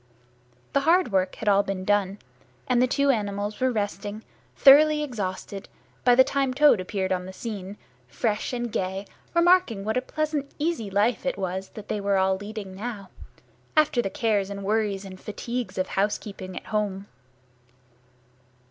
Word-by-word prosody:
The - - +4
hard 330 0 +3
work 185 -1 +1
had 220 - -7
all 200 -1 +5
been 195 -2 -4
done, 200 -1 +1 0.5
and 250 -1 +3
the 255 - +4
two 280 +2 +3
animals 205 -2 -2
were 260 0 +2
resting, 205 0 -3 0.3
thoroughly 300 +2 +7
exhausted, 200 -6 -5 0.3
by 245 -1 +6
the 260 - +8
time 270 -1 -1
Toad 290 -7 +6
appeared 190 0 -2
on 180 0 -1
the - - -7
scene, 205 -2 -6 0.3
fresh 210 - -1
and 240 -2 -3
gay, 190 +1 -2 0.3
remarking 340 - +4
what 220 +3 0
a - - +2
pleasant 300 0 -2
easy 305 -9 -1
life 210 +4 +1
it 270 -6 -1
was 190 0 -3
they 210 -1 -4
were 200 0 +1
all 190 0 +3
leading 205 -1 -7
now, 200 -2 -6 0.7
after 300 -5 +4
the 195 - -2
cares 205 -1 0
and 200 0 -6
worries 205 -1 0
and 185 -1 -10
fatigues 235 -1 -5
of 185 0 -1
housekeeping 195 -2 -2
at - - -7
home. 200 -2 -1
210 Hz, 160 wpm, -25 LUFS, 195-250 Hz, 0.7 s, the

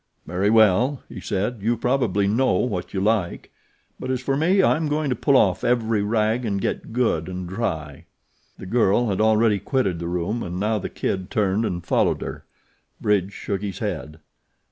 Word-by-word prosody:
"Very 90 +5 0
well," 115 +5 +4
he - - -8
said; 105 +4 -2
"you 115 +3 +1
probably 120 -6 +1
know 115 +5 +2
what 95 -4 -2
you 95 - -2
like; 100 -3 -1 0.5
but 130 - -5
as 130 -1 0
for 135 +2 -1
me, 180 +7 +3
I'm 160 -3 +2
going 150 -1 -1
to - - +1
pull 140 0 +3
off 95 -7 +2
every 115 -3 +1
rag 110 +3 +1
and 100 -4 -1
get - - -3
good 110 -9 0
and 90 -1 -5
dry." 80 - -4 0.5
The - - -9
girl 115 +2 +2
had 95 +1 0
already 110 -1 +3
quitted 95 - -1
the 85 - -4
room 90 +7 -2
and 90 -2 -4
now 105 +2 0
The - - -5
Kid 95 -2 -3
turned 105 +1 +1
and 85 -5 -3
followed - - +1
her. - - -7 0.5
Bridge 100 -2 +1
shook 100 -1 -4
his 100 -2 -4
head. 80 - -4
105 Hz, 185 wpm, -23 LUFS, 95-120 Hz, 0.5 s, well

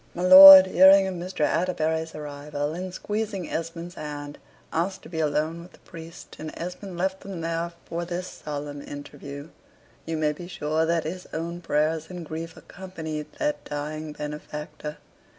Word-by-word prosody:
My 175 - -3
lord, 190 +1 +12
hearing 190 +1 +6
of 190 - -3
Mr. 180 0 -6
Atterbury's 160 -1 0
arrival, 145 0 -5
and 185 +2 -5
squeezing 205 -2 -4
Esmond's 165 +1 -5
hand, 145 -3 -7 0.3
asked 185 +4 -2
to - - -12
be 160 -2 -5
alone 155 +2 -1
with 175 +2 -14
the - - -17
priest; 165 -2 -12
and 155 0 -6
Esmond 180 +1 -7
left 190 +2 -1
them 195 -3 -8
there 165 +1 -3
for 170 +1 -4
this 175 +1 -4 0.2
solemn 145 -1 -5
interview. 145 +1 -9 0.6
You 165 -1 -2
may 155 -1 +1
be 175 +4 -9
sure 160 -2 -1
that 165 -1 +1
his 180 +4 -6
own 170 +2 -4
prayers 160 0 0
and 180 -2 -7
grief 160 +1 -7
accompanied 160 -5 -7
that 295 -1 -2
dying 150 +1 -5
benefactor. 150 0 -7
165 Hz, 160 wpm, -25 LUFS, 150-180 Hz, 0.6 s, lord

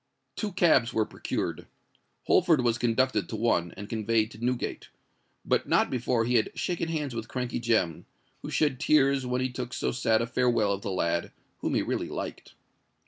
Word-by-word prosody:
Two 210 -2 -3
cabs 155 -10 +3
were 110 - +2
procured: - - -4 0.6
Holford 170 -6 +4
was 120 -1 +1
conducted 120 -4 +1
to - - -4
one, 105 -7 +1
and 105 0 -7
conveyed 110 0 0
to 110 +2 -11
Newgate,—but 125 0 -4
not - - +3
before 120 -2 0
he 120 +1 +3
had 110 - +1
shaken 175 -2 -1
hands 150 -5 -2
with 115 -1 -5
Crankey 125 0 -3
Jem, 110 -9 0 0.3
who - - -6
shed 145 -5 +1
tears 140 -3 +3
when 125 0 0
he 130 0 -1
took 125 -1 -5
so - - -1
sad 115 -2 +2
a 115 - 0
farewell 120 -4 +2
of 100 - -4
the 100 - -4
lad, 85 -2 -1 0.3
whom - - -1
he - - +2
really - - -2
liked. - - -6
120 Hz, 180 wpm, -28 LUFS, 110-130 Hz, 0.6 s, Holford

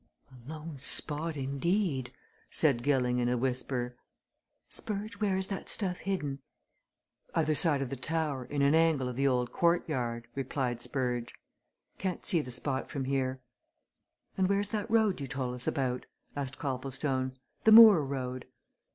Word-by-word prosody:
"A 125 0 -14
lone 155 -2 -7
spot 150 +3 +3
indeed!" 140 - -1 0.4
said 140 -7 +3
Gilling 125 -2 +1
in 120 0 +1
a 125 - +1
whisper. 125 0 -2 0.7
"Spurge, 210 +1 -5
where 200 -3 +1
is 190 0 -1
that 195 - -5
stuff 185 -4 +1
hidden?" 150 -8 -3 1.0
"Other 155 -1 +2
side 150 -3 +4
of 125 - -7
the - - -2
tower 145 0 -2
in 145 +1 -1
an 140 +1 +4
angle 160 -5 +3
of 125 - -5
the 135 +2 +1
old 125 -2 0
courtyard," 130 -9 0
replied 130 -2 -2
Spurge, 125 -3 -2 0.6
"Can't 185 -2 -3
see 170 - +3
the 130 - -9
spot 130 +2 -1
from 135 -2 -3
here." 130 -1 -1 1.0
"And 190 -1 +2
where's 200 0 +1
that 210 -1 -3
road 220 -7 +2
you 135 - -4
told 130 -2 -3
us 125 0 -8
about?" 125 -2 -1 0.3
asked 135 -2 -4
Copplestone. 130 -1 -2 0.3
"The 220 - +7
moor 220 -6 +10
road?" 130 -2 -4
140 Hz, 150 wpm, -30 LUFS, 130-165 Hz, 1.0 s, moor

